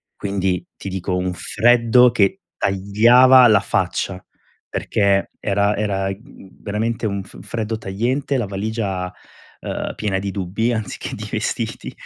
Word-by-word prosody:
quindi 95 -3 -1
ti 100 - -6
dico 95 0 -3
un 90 0 -1
freddo 120 +5 +4
che 100 -5 +1
tagliava 120 +7 +5
la 110 -3 +5
faccia, 95 -1 -2 0.5
perché 100 -1 +1
era 100 0 +1
era, 100 -2 -1
mhmm, 100 0 -10
veramente 110 +2 -2
un 100 -1 -3
f - - -14
freddo 110 -1 -4
tagliente, 125 +8 -1
la 120 - -1
valigia, 100 -2 -3 0.5
ehm, - - -4
piena 100 -3 -1
di 100 +1 -4
dubbi 100 +4 -1
anziché 110 -3 -4
di - - -7
vestiti. - - -3
100 Hz, 135 wpm, -20 LUFS, 95-115 Hz, 0.5 s, tagliava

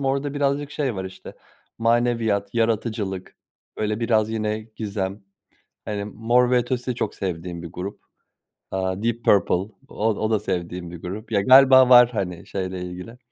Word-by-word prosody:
morda 140 +1 -1
birazcık 145 0 0
şey 140 -5 -2
var, 95 -1 -4
işte, 95 0 -10 0.4
maneviyat, 115 -2 +1
yaratıcılık, 110 -4 -1 0.4
böyle, 105 +1 -2
biraz 110 -2 +2
yine 110 -1 -2 0.2
gizem. 100 -2 -3 0.7
Hani, 105 -1 -3
Mor 120 +4 +2
ve 125 - +5
Ötesi 125 +1 -1
de 120 - -5
çok 105 - -3
sevdiğim 85 -2 -4
bir 85 - -7
grup. 90 +3 -6 0.7
Aaa, 95 +1 -2
Deep 115 0 -1
Purple, 100 -3 +4 0.3
o 110 - -3
o 110 0 -1
da 110 -2 +2
sevdiğim 90 -3 -4
bir 85 -1 -10
grup. 105 +5 -7
Ya, 100 - +3
galiba 130 +1 +7
var, 125 -1 +8
hani, 90 -5 -4
şeyle 95 -1 -4
ilgili. 90 +7 -8
110 Hz, 160 wpm, -23 LUFS, 95-120 Hz, 0.7 s, var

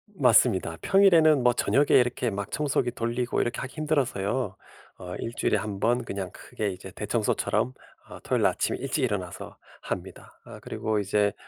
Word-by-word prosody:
맞습니다. 95 - +3
평일에는 165 -8 +5
뭐 125 0 +5
저녁에 145 +4 +2
이렇게 125 -1 +3
막 100 0 -4
청소기 140 -4 0
돌리고 120 +1 -1
이렇게 120 +2 -2
하기 130 - -7
힘들어서요. 130 - -1 0.4
어 90 0 -7
1 115 - -4
주일에 - - +1
1 105 -2 -4
번 120 +1 +1
그냥 100 -4 -5
크게 105 - -4
이제 90 - -9
대청소처럼 65 - -1 0.4
어 - - -10
토요일 - - 0
날 - - +5
아침에 - - -1
일찍 135 +2 -2
일어나서 100 -7 -4 0.2
합니다. - - -7
어 - - -10
그리고 110 -1 -2
이제 100 +1 +1
120 Hz, 370 characters per minute, -26 LUFS, 100-135 Hz, 0.4 s, 평일에는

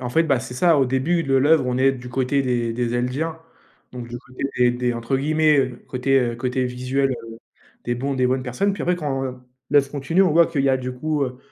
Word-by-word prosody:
En 125 - -4
fait, 165 +7 +3
bah, 140 -5 +1
c'est 125 - -8
ça, 165 +2 +3
au 135 - +3
début 145 +7 0
de 135 -1 0
l'œuvre, 140 0 +4
on 125 - -1
est 135 +1 +3
du 125 -1 -9
côté 130 +3 0
des 120 -3 -1
des 120 0 -2
Eldiens 140 +7 -2 0.5
donc 120 -1 -7
du 120 +1 -6
côté 130 -1 -10 0.2
des 125 0 +5
des, 125 0 -1
entre 115 +3 -1
guillemets, 155 +2 +2
heu, 130 -2 0
côté, 135 +1 +1
heu, 120 -2 -1
côté 125 +1 -1
visuel, 130 +2 -1
heu, 115 -2 -8 0.5
«des 120 - -1
bons 135 +3 -2
des 130 -1 +2
bonnes 130 +1 0
personnes», 165 - -1
puis 200 - -5
après, 180 0 +1
quand 140 -5 -2 0.5
l'œuvre 140 -2 +3
continue, 150 +7 +1
on 185 - +3
voit 170 +1 +5
qu'il 145 -5 -1
y 135 - +2
a 130 - +3
du 130 0 -5
coup, 150 +2 -1
heu, 125 -1 -7
130 Hz, 245 wpm, -22 LUFS, 125-145 Hz, 0.5 s, des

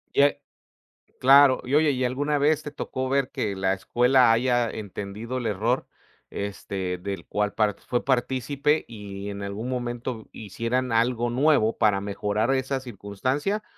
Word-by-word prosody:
Y - - +5
a 145 0 +4 0.8
claro. 135 0 +6
Y 125 - -5
oye, 150 0 +4
¿y 130 -1 -1
alguna 145 +4 0
vez 150 +1 +2
te 150 - -6
tocó 130 -2 -4
ver 135 -1 +1
que 110 -8 -2
la 95 0 +1
escuela 125 +5 +3
haya 120 0 +2
entendido 105 +4 -6
el 120 - -2
error, 110 +5 0 0.4
este, 95 -2 -4
del 95 -2 -5
cual 105 0 -1
part 105 -2 +1
fue 120 - -2
partícipe 135 +3 0
y 100 -3 -7
en 100 0 -6
algún 100 +4 -5
momento 120 -2 -4
hicieran 115 +5 -3
algo 120 +1 +1
nuevo 130 -4 +3
para 105 -3 +2
mejorar 105 +4 -1
esa 135 0 -1
circunstancia? 130 - -3
120 Hz, 150 wpm, -25 LUFS, 105-130 Hz, 0.8 s, claro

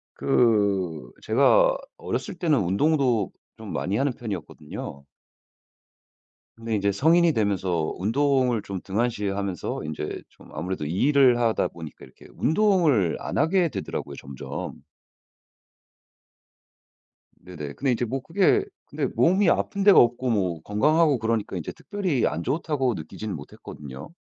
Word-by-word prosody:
그 100 - +1
제가 - - +4 0.2
어렸을 - - -4
때는 155 - +2
운동도 120 - +1 0.3
좀 - - -8
많이 100 +3 -1
하는 140 +1 +1
편이었거든요. 80 -10 -7 1.5
근데 115 -1 -3
인제 100 -1 +1
성인이 165 - +4
되면서 95 - 0
운동을 125 +2 +1
좀 100 -3 -5
등한시 105 +1 -1
하면서 95 -3 -3
인제 75 0 -5
좀 - - -19
아무래도 85 0 -4
일을 125 - +3
하다 115 -2 +1
보니까 80 -3 -10
이렇게 65 - -17
운동을 160 - +2
안 - - -4
하게 170 +2 +2
되더라고요, 100 -9 -5
점점. 70 -1 -7 2.6
네네. 75 -5 -8
근데 135 - 0
이제 120 0 0
뭐 130 +4 -3
그게 195 - +2 0.2
근데 - - -3
몸이 185 +2 +4
아픈 200 +3 0
데가 200 -1 +8
없고 120 +2 +3
뭐 90 -8 0
건강하고 150 +6 +2
그러니까 110 -3 -1
이제 80 - -5
특별히 190 - -2
안 80 +3 -2
좋다고 140 - -1
느끼지는 95 +6 -6
못했거든요. 70 - -10
115 Hz, 290 characters per minute, -25 LUFS, 95-145 Hz, 2.6 s, 데가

